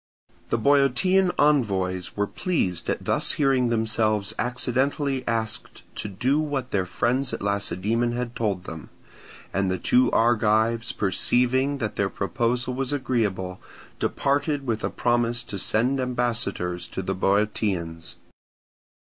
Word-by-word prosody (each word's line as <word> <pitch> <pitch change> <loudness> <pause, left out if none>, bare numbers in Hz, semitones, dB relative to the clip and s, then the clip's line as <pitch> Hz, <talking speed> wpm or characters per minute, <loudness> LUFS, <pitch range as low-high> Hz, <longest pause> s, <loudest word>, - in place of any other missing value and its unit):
The - - +1
Boeotian 145 - +3
envoys 95 - +1
were 100 - +2
were - - -15
pleased 95 - -1
at - - -2
thus - - +1
hearing 135 -4 +2
themselves 110 -2 0
accidentally 130 +3 0
asked 115 -2 -3
to - - -3
do 125 +9 +1
what 145 -5 -2
their 95 -2 0
friends 125 +8 0
at - - -9
Lacedaemon 100 +4 0
had 120 0 -4
told 100 -5 -1
them; 80 -5 -8 0.6
and 100 0 +1
the 95 - 0
two 125 +7 +3
Argives 115 0 +2
perceiving 125 +7 +1
that 110 -6 -3
their 100 -1 +1
proposal 120 +7 -1
was 130 +1 -2
agreeable, 105 -10 -1 0.4
departed 140 0 0
with 110 -3 -2
a - - 0
promise 120 -1 +1
to 100 -4 -5
send 125 +8 +1
ambassadors 120 -8 -1
to 95 - -5
the 95 - -1
Boeotians. 95 -4 -1
115 Hz, 130 wpm, -25 LUFS, 100-130 Hz, 0.6 s, Boeotian